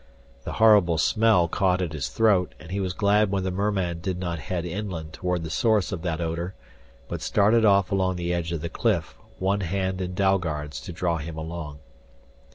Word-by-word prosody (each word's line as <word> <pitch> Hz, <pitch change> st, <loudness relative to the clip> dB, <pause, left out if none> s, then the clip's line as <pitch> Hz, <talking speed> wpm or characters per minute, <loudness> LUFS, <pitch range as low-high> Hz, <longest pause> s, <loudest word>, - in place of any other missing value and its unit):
The -, -, -4 dB
horrible 105 Hz, -7 st, +5 dB
smell 105 Hz, 0 st, +3 dB
caught 90 Hz, +2 st, +1 dB
at 85 Hz, -4 st, -2 dB
his 75 Hz, -4 st, -3 dB
throat, 105 Hz, -5 st, +2 dB
and 85 Hz, +1 st, -12 dB
he 100 Hz, -, -1 dB
was 95 Hz, -2 st, -1 dB
glad 105 Hz, 0 st, +3 dB
when 95 Hz, -1 st, -1 dB
the 95 Hz, -, -1 dB
merman 95 Hz, -3 st, -1 dB
did 90 Hz, +1 st, -3 dB
not 85 Hz, -3 st, -3 dB
head 85 Hz, +4 st, -3 dB
inland 85 Hz, -4 st, -5 dB
toward 90 Hz, 0 st, -2 dB
the 80 Hz, -, -5 dB
source 110 Hz, -4 st, +2 dB
of 90 Hz, -, -4 dB
that 85 Hz, -2 st, -2 dB
odor, 85 Hz, +2 st, -3 dB, 0.5 s
but -, -, -5 dB
started 110 Hz, +2 st, +3 dB
off 100 Hz, -2 st, +4 dB
along 95 Hz, -1 st, +1 dB
the 90 Hz, 0 st, -2 dB
edge 85 Hz, -1 st, -2 dB
of 85 Hz, -3 st, -3 dB
the 85 Hz, -, -3 dB
cliff, -, -, -1 dB, 0.2 s
one 100 Hz, +2 st, 0 dB
hand 95 Hz, +1 st, -2 dB
in 90 Hz, 0 st, -4 dB
Dalgard's 85 Hz, -6 st, 0 dB
to -, -, -7 dB
draw 85 Hz, -1 st, -1 dB
him 80 Hz, +1 st, -6 dB
along. 80 Hz, -2 st, -6 dB
90 Hz, 195 wpm, -25 LUFS, 85-100 Hz, 0.5 s, horrible